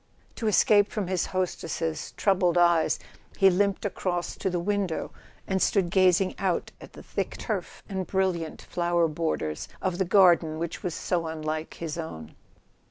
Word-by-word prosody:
To 225 Hz, -, -2 dB
escape 205 Hz, 0 st, +4 dB
from 210 Hz, -3 st, -2 dB
his 180 Hz, -1 st, -1 dB
hostess's 165 Hz, -3 st, -3 dB
troubled 180 Hz, -3 st, +2 dB
eyes 170 Hz, -2 st, +4 dB, 0.4 s
he 195 Hz, -1 st, +6 dB
limped 200 Hz, +2 st, +1 dB
across 180 Hz, -2 st, -2 dB
to 190 Hz, -, -1 dB
the 180 Hz, -1 st, -1 dB
window 195 Hz, -2 st, -1 dB, 0.3 s
and 190 Hz, -1 st, -1 dB
stood 185 Hz, -4 st, +2 dB
gazing 185 Hz, 0 st, +4 dB
out 185 Hz, -3 st, -1 dB
at -, -, -12 dB
the -, -, -11 dB
thick -, -, -3 dB
turf -, -, -4 dB
and 190 Hz, -3 st, -3 dB
brilliant 185 Hz, -4 st, -1 dB
flower 175 Hz, -1 st, +1 dB
borders 150 Hz, -, -2 dB
of 185 Hz, -1 st, -2 dB
the 190 Hz, -, +2 dB
garden 175 Hz, -4 st, +5 dB
which 170 Hz, 0 st, -4 dB
was 175 Hz, -3 st, -3 dB
so 170 Hz, -2 st, -1 dB
unlike 155 Hz, 0 st, -4 dB
his 165 Hz, 0 st, -5 dB
own. 80 Hz, -, -7 dB
175 Hz, 160 wpm, -27 LUFS, 165-190 Hz, 0.4 s, he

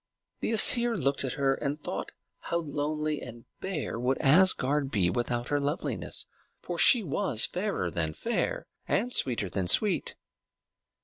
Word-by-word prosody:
The -, -, -2 dB
Æsir 235 Hz, +1 st, +5 dB
looked 140 Hz, -4 st, 0 dB
at 130 Hz, -, -3 dB
her 135 Hz, -1 st, +1 dB
and 140 Hz, +1 st, -3 dB
thought 150 Hz, -, -6 dB, 0.3 s
how 170 Hz, -, -3 dB
lonely 150 Hz, -1 st, -3 dB
and 120 Hz, -1 st, -11 dB
bare 155 Hz, -11 st, -4 dB
would 125 Hz, +2 st, 0 dB
Asgard 145 Hz, -3 st, +3 dB
be 95 Hz, -8 st, +1 dB
without 120 Hz, +3 st, -3 dB
her 145 Hz, -, +1 dB
loveliness; 145 Hz, +3 st, -3 dB, 0.3 s
for -, -, -6 dB
she 240 Hz, -5 st, +6 dB
was 150 Hz, -, +2 dB
fairer 180 Hz, -, -3 dB
than 80 Hz, -2 st, -2 dB
fair, -, -, -2 dB, 0.2 s
and 245 Hz, +5 st, -1 dB
sweeter 115 Hz, -6 st, +1 dB
than 95 Hz, 0 st, -3 dB
sweet. 200 Hz, -, +3 dB
140 Hz, 145 wpm, -28 LUFS, 120-170 Hz, 0.3 s, she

